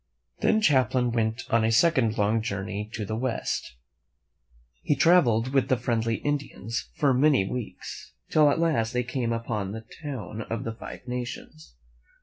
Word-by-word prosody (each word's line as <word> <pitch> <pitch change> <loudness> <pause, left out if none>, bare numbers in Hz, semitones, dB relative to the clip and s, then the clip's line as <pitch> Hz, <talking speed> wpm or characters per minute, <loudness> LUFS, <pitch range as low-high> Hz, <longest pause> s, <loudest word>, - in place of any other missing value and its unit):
Then 220 - +3
Champlain 130 - +3
went 115 +1 -1
on 115 -1 +4
a 110 - +2
second 115 -3 +3
long 105 +2 +2
journey 100 -1 -4
to 105 - -3
the 110 - -3
west. 115 - -2 1.1
He 145 - +1
traveled 130 -7 +4
with 135 -2 +3
the 130 - +3
friendly 115 -1 0
Indians 125 - -3
for 140 -2 +3
many 130 -6 +3
weeks, 125 -1 -6 0.2
till 150 -2 +5
at 145 - +1
last 140 -9 +1
they 125 0 +1
came 120 -1 -2
upon 110 -4 -2
the 110 0 -7 0.2
town 115 - -5
of 115 -1 -3
the 115 - -4
Five 115 - -10
Nations. 120 - -6
115 Hz, 155 wpm, -26 LUFS, 110-130 Hz, 1.1 s, till